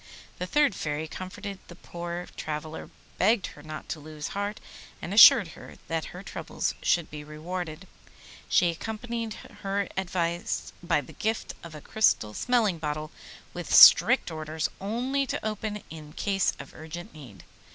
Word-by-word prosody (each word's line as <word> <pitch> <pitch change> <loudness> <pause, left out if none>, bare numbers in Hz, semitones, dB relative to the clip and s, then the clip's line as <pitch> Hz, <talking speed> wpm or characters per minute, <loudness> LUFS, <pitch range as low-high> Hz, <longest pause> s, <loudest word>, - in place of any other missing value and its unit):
The 180 - -3
third 295 +1 +3
Fairy 155 -2 -3
comforted 190 +3 -7
the 175 - -11
poor 175 0 -6
traveller, 155 +1 -5 0.3
begged 210 0 +3
her 145 - -14
not 155 +1 -8
to 160 - -4
lose 150 0 -7
heart, 205 +1 -3 0.4
and 180 - -5
assured 210 -3 +9
her - - -12
that 165 -1 -1
her 180 +2 -9
troubles - - -3
should 170 -2 +1
be 150 0 -7
rewarded. 160 +3 -6 0.6
She 175 -1 +4
accompanied 225 +4 -5 0.3
her 195 0 -1
advice 175 -2 -2
by 170 -4 +1
the 130 - -13
gift 220 +1 -2
of 165 -2 -9
a 150 - -9
crystal 110 - +2
smelling 220 - +1
bottle, 155 0 -3 0.4
with - - -6
strict - - +8
orders 155 0 -3
only 250 +7 -1
to - - -3
open 215 -1 -3
it - - -15
in 155 -2 -10
case 195 -2 +1
of 140 - -10
urgent 160 +2 -9
need. 130 -10 -12
175 Hz, 155 wpm, -27 LUFS, 155-205 Hz, 0.6 s, assured